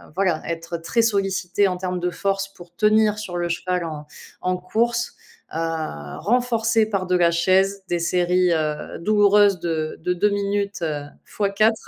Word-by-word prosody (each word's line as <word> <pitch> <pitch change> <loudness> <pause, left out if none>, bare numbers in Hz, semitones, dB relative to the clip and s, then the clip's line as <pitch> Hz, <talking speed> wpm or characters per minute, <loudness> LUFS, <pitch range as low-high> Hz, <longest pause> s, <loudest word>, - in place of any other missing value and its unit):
voilà, 185 -4 +1
être 165 0 -4
très 230 +8 0
sollicitées 195 -2 +1
en 180 -1 -2
termes 180 0 -3
de 180 0 0
force 195 +2 -1
pour 175 -2 -15
tenir 215 +1 +3
sur 180 -4 -5
le 175 0 -1
cheval 180 +1 -1
en 150 -2 -7 0.3
en 185 0 0
course, 235 +6 -1 0.4
heu, - - -3 0.6
renforcer 230 -1 +2
par 195 -3 -1
de 180 0 +1
la 175 -1 +4
chaise, 190 +3 +2
des 175 - 0
séries, 180 +1 +2
heu, 155 -2 -2
douloureuses 205 0 +4
de 160 -2 -2
de 180 +2 0
2 205 +4 +2
minutes, 200 -1 -1
heu, 150 -3 -2 0.2
fois 200 -2 -2
4. 215 +2 +2
185 Hz, 165 wpm, -22 LUFS, 175-205 Hz, 0.6 s, la